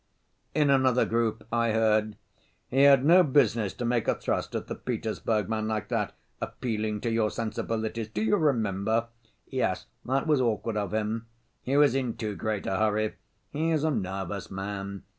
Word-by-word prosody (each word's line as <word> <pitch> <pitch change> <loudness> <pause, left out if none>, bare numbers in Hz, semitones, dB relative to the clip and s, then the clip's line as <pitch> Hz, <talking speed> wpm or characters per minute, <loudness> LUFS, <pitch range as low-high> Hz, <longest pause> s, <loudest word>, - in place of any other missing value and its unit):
In 150 -2 +4
another 130 -2 +4
group 115 -1 0
I 115 -1 +1
heard: 110 -1 +2 0.5
"He 135 +2 +2
had 140 -1 +6
no 175 +4 +7
business 125 - +2
to 120 - -4
make 120 -1 0
a - - +3
thrust - - -2
at - - -2
the - - -5
Petersburg 105 -4 -2
man 110 -1 -1
like 110 -2 -2
that; - - -1 0.3
'appealing 110 -3 -3
to 115 - -1
your 115 -1 +2
sensibilities'—do 110 - -3
you 210 - +3
remember?" 115 - +1 0.4
"Yes, 125 -8 -1 0.2
that 135 +2 0
was 150 -4 +3
awkward 115 -2 0
of 100 -2 -2
him." 110 +1 -2 0.3
"He 135 +2 0
was 145 -4 +5
in 130 -3 -1
too 105 -3 -3
great 110 -1 -2
a 95 - 0
hurry." 110 0 +1 0.4
"He 160 +3 0
is 155 -2 +1
a 160 - +2
nervous 95 - -3
man." 100 0 -5
115 Hz, 170 wpm, -28 LUFS, 105-130 Hz, 0.5 s, no